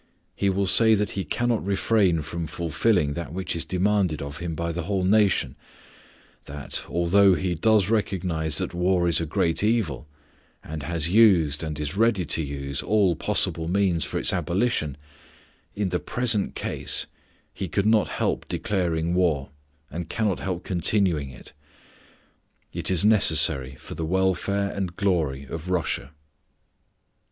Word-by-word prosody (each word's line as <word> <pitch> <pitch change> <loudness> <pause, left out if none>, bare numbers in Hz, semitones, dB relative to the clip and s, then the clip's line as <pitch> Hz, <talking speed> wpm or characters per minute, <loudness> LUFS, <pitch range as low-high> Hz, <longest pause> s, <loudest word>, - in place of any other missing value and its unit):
He 100 - 0
will 95 +1 0
say 110 +3 +5
that 105 0 -1
he 95 - -3
cannot 120 +7 -1
refrain 95 -4 +1
from 80 +4 -5
fulfilling 80 +1 0
that 85 -1 -6
which 95 -1 -3
is 85 - -1
demanded 95 -3 0
of 70 +2 -7
him 85 -2 -4
by 85 +1 -3
the 85 +2 -3
whole 95 +2 -2
nation, 100 +1 +2 0.9
that, 70 0 -4
although 95 +3 +4
he 90 -1 -1
does 105 +3 +2
recognize 90 -7 -1
that - - -2
war 90 0 +1
is 85 -1 +3
a 80 - -3
great 80 +4 0
evil, 105 - 0 0.6
and 80 0 -6
has 80 +2 -1
used, 90 -9 +4
and 80 -2 -5
is 75 +3 -4
ready 105 -4 +2
to 80 - +1
use, 70 -1 -4
all 100 -5 +2
possible 80 +2 0
means 90 -2 +1
for - - -3
its - - +1
abolition 85 - -1 0.8
in 100 -2 -1
the 90 0 -1
present 120 -5 0
case - - -1 0.5
he 95 - -5
could 100 +5 -1
not 110 -1 +3
help - - -2
declaring 85 -4 -1
war, 80 -7 0 0.4
and 85 -1 -6
cannot 110 -4 -1
help 90 -2 -4
continuing 90 -5 +1
it. 65 -2 -12 1.2
It - - -1
is 95 +1 +4
necessary 70 -11 +4
for - - -10
the 80 - -4
welfare 95 +2 0
and 95 -3 -4
glory 85 -9 0
of 80 +5 -7
Russia. 85 -7 -2
90 Hz, 150 wpm, -24 LUFS, 80-100 Hz, 1.2 s, say